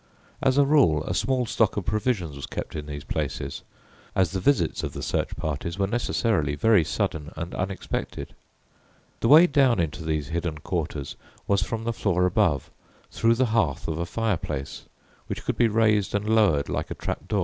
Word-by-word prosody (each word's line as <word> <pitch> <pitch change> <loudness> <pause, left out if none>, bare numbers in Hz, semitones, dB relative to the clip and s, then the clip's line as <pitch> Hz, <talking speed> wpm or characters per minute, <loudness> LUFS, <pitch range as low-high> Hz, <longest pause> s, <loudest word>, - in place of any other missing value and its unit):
As 130 0 +2
a 145 - +6
rule, 130 - +4
a 90 - -3
small 130 +5 +1
stock 110 -2 +1
of 100 - -2
provisions 105 - -1
was 70 - -7
kept - - -6
in 75 -1 -5
these 70 -1 -6
places, 70 -2 -3 0.5
as 95 -4 +2
the 95 - -2
visits 140 +10 +1
of - - -4
the - - -6
search - - -1
parties 80 +4 -3
were 100 - +1
necessarily 100 - 0
very 105 +1 +4
sudden 75 0 -2
and 85 +2 -5
unexpected. 95 +1 -4 0.9
The - - +1
way 155 +7 +9
down 135 - +3
into 80 0 -2
these 75 -3 -2
hidden 85 -1 -2
quarters 75 -3 -4 0.3
was 100 -1 +2
from 115 0 -3
the 115 0 -1
floor 90 -5 +1
above, 90 - +1 0.4
through 115 0 +2
the 130 +2 +2
hearth 85 - +1
of 80 0 -2
a 85 - -2
fireplace, 85 -12 -3 0.4
which - - -5
could - - -1
be 120 - +4
raised 105 -3 +2
an 100 +1 -1
lowered 105 -10 +3
like - - -3
a - - -4
trap - - -5
door. - - 0
95 Hz, 185 wpm, -25 LUFS, 80-115 Hz, 0.9 s, way